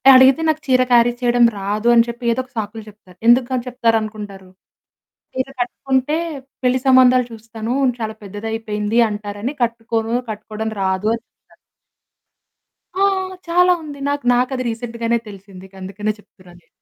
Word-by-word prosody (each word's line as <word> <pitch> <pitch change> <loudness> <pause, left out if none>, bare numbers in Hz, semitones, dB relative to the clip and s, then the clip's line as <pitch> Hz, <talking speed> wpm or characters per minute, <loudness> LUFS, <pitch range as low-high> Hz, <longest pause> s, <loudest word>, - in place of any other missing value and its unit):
అడిగితే 260 +4 +6
నాకు 310 0 +1
చీర 255 -1 +4
క్యారీ 240 0 +5
చేయడం 240 -1 +4
రాదు 205 +3 -2
అని 230 -1 +6
చెప్పి, 235 +1 -7
ఏదో 230 - -1
ఒక 255 - -23
సాకులు 220 +1 -4
చెప్తారు. 200 -4 -19
ఎందుకు 240 +1 +6
ఆళ్ళు 250 -1 -1
చెప్తారనుకుంటారు? 215 -5 -2 0.8
చీర 260 +1 -2
కట్టుకుంటే 265 +4 -1 0.5
పెళ్లి 250 +1 +2
సంబంధాలు 255 -1 +6
చూస్తాను, 225 +1 -6 0.3
చాలా 220 -1 -4
పెద్దదయిపోయింది 210 +1 -2
అంటారని 210 +5 -5
కట్టుకోను, 230 -1 -1
కట్టుకోవడం 215 +1 -5
రాదు 190 +2 0
అని 230 - -10
చెప్తారు. - - -29 1.4
ఆ! - - 0 0.5
చాలా 360 +1 +4
ఉంది. 290 -2 -9
నక్ 285 -2 -2
నాకది 255 +1 0
రీసెంట్‌‌గానె 235 0 -2
తెలిసింది. 195 -2 -12
ఇంకా 195 - -17
అందుకనే 205 +3 -3
చెప్తున్నా 185 -3 -19
నేను. 160 - -35
230 Hz, 140 wpm, -19 LUFS, 210-250 Hz, 1.4 s, అడిగితే